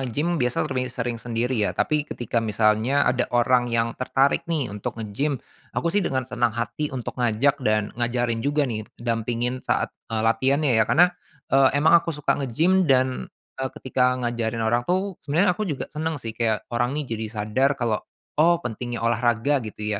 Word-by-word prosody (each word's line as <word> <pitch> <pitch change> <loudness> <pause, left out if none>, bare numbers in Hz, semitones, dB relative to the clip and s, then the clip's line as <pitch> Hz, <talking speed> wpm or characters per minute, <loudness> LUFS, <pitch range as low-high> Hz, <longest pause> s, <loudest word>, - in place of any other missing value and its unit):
nge-gym 145 +6 -1
biasa 125 +4 +1
lebih 130 -3 -2
sering 120 -2 -4
sendiri 120 +1 -1
ya, 105 - 0
tapi 150 -1 0
ketika 120 -1 -2
misalnya 110 +5 +2
ada 125 0 +1
orang 120 0 +3
yang 115 0 0
tertarik 135 +2 +1
nih 150 -10 -1
untuk 105 +1 -5
nge-gym, 115 +7 -2 0.4
aku 170 0 0
sih 205 - +3
dengan 130 -8 -1
senang 120 -2 -1
hati 120 +6 -2
untuk 130 -4 -5
ngajak 125 +5 +2
dan 110 -4 0
ngajarin 120 -1 -1
juga 145 +4 +1
nih 110 -5 -4
dampingin 120 +2 -2
saat, - - -1 0.2
eee, 110 -1 -1
latihannya 130 +5 +2
ya. 110 - +2
Karena, 175 +3 +5 0.4
eee, 135 0 +6
emang 155 +4 +4
aku 165 -2 -5
suka 145 0 0
nge-gym 165 +8 +2
dan, 130 -1 +2 0.3
eee, 130 - -1
ketika 125 -1 +1
ngajarin 115 -2 -2
orang 120 +2 +1
tuh 190 +1 -1
sebenarnya 175 +6 +2
aku 205 +3 -3
juga 145 -5 -4
seneng 160 +1 -2
sih 115 -5 -6
kayak 110 -1 -1
orang 120 +4 0
ini 150 - -2
jadi 110 -3 -4
sadar 115 +6 0
kalau, 115 -4 0 0.4
oh 170 +2 +5
pentingnya 120 0 -4
olahraga 120 +4 +2
gitu 105 -1 -5
125 Hz, 175 wpm, -24 LUFS, 115-140 Hz, 0.4 s, eee